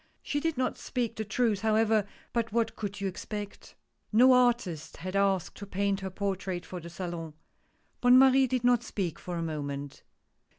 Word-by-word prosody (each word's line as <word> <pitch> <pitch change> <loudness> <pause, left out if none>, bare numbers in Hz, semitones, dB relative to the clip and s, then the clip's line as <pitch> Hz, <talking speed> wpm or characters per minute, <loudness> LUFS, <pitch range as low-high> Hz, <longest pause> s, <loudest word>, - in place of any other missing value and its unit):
She 290 - -1
did 325 -1 -1
not 255 - -1
speak 240 -3 -2
the 220 - -3
truth, 215 0 +1
however 220 -1 +2
— - - -29
but 230 -2 0
what 225 0 0
could 205 -1 -5
you 200 - -1
expect? 205 +2 -7 0.4
No 250 +4 +7
artist 235 -11 +1
had 185 +2 -5
asked 195 -3 +1
to 200 - -8
paint 200 0 0
her 190 -1 -4
portrait 190 -2 -3
for 180 - -6
the 170 0 -9
Salon 170 -3 -6 0.7
Bonne 245 +1 +7
Marie 265 0 +6
did 255 -1 -1
not 245 -1 +4
speak 185 -8 -3
for 180 - -5
a 165 - -2
moment. 145 -3 -5
205 Hz, 180 wpm, -29 LUFS, 180-235 Hz, 0.7 s, No